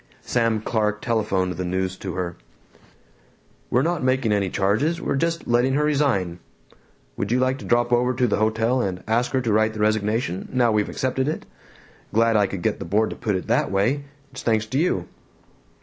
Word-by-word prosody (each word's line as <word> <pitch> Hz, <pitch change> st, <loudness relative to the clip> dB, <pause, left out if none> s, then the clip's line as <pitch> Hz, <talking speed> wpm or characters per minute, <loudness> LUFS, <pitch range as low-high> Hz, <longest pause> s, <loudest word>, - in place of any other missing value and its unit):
Sam 115 Hz, -3 st, +1 dB
Clark 105 Hz, -2 st, -1 dB
telephoned 95 Hz, -5 st, 0 dB
the 90 Hz, -, -2 dB
news 95 Hz, +1 st, -1 dB
to 95 Hz, -3 st, -5 dB
her. 90 Hz, -2 st, -3 dB, 1.3 s
"We're 125 Hz, +3 st, +2 dB
not 170 Hz, -2 st, -1 dB
making 130 Hz, -3 st, +1 dB
any 100 Hz, -2 st, +1 dB
charges. 110 Hz, -, +1 dB
We're 155 Hz, -, -1 dB
just 165 Hz, +3 st, -1 dB
letting 120 Hz, +3 st, +2 dB
her 150 Hz, -, +2 dB
resign. 135 Hz, -, +1 dB, 0.8 s
Would 100 Hz, -, -2 dB
you 125 Hz, -, +3 dB
like 130 Hz, +1 st, +1 dB
to -, -, -9 dB
drop 120 Hz, 0 st, +2 dB
over 125 Hz, +1 st, +3 dB
to 125 Hz, 0 st, +2 dB
the 110 Hz, -, +1 dB
hotel 110 Hz, +4 st, +1 dB
and 95 Hz, -4 st, -3 dB
ask 115 Hz, +2 st, +1 dB
her 130 Hz, -, +2 dB
to 115 Hz, -4 st, 0 dB
write 110 Hz, +1 st, +2 dB
the -, -, -6 dB
resignation, 105 Hz, -2 st, 0 dB
now 125 Hz, -2 st, +3 dB
we've 105 Hz, -1 st, +1 dB
accepted 130 Hz, +1 st, -1 dB
it? 155 Hz, -, -3 dB, 0.7 s
Glad 115 Hz, 0 st, +4 dB
I 105 Hz, -2 st, +4 dB
could 95 Hz, -2 st, -6 dB
get -, -, 0 dB
the -, -, -4 dB
board 105 Hz, +6 st, +1 dB
to -, -, -5 dB
put 105 Hz, -4 st, -1 dB
it 95 Hz, -, -3 dB
that -, -, +1 dB
way. 115 Hz, +9 st, 0 dB, 0.3 s
It's 130 Hz, -, -8 dB
thanks 110 Hz, -2 st, +1 dB
to 130 Hz, +5 st, -1 dB
you." 175 Hz, +3 st, 0 dB
115 Hz, 195 wpm, -23 LUFS, 100-130 Hz, 1.3 s, Glad